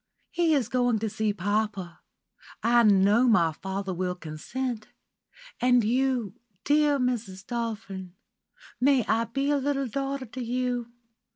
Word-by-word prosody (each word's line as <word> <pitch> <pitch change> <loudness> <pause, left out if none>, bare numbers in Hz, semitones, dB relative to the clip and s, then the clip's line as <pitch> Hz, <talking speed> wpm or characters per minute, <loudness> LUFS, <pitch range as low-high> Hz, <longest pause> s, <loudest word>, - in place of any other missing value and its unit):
"He 335 -3 +2
is 260 -6 +1
going 245 -1 +1
to 220 +1 -2
see 215 0 0
papa. 205 -2 -2 0.6
I 240 +1 +5
know 210 +3 +5
my 175 -9 +4
father 190 +3 -4
will 180 0 -2
consent. 215 +9 -5 0.7
And 245 -1 +4
you, 245 -2 0 0.3
dear 295 -1 +3
Mrs. 230 -7 -2
Dolphin? 215 -6 -5 0.6
May 265 -2 +3
I 225 +1 +1
be 275 +5 -1
a 290 - +3
little 275 0 -1
daughter 275 +2 -3
to 255 +2 -7
you? 245 0 -2
235 Hz, 130 wpm, -27 LUFS, 200-255 Hz, 0.7 s, I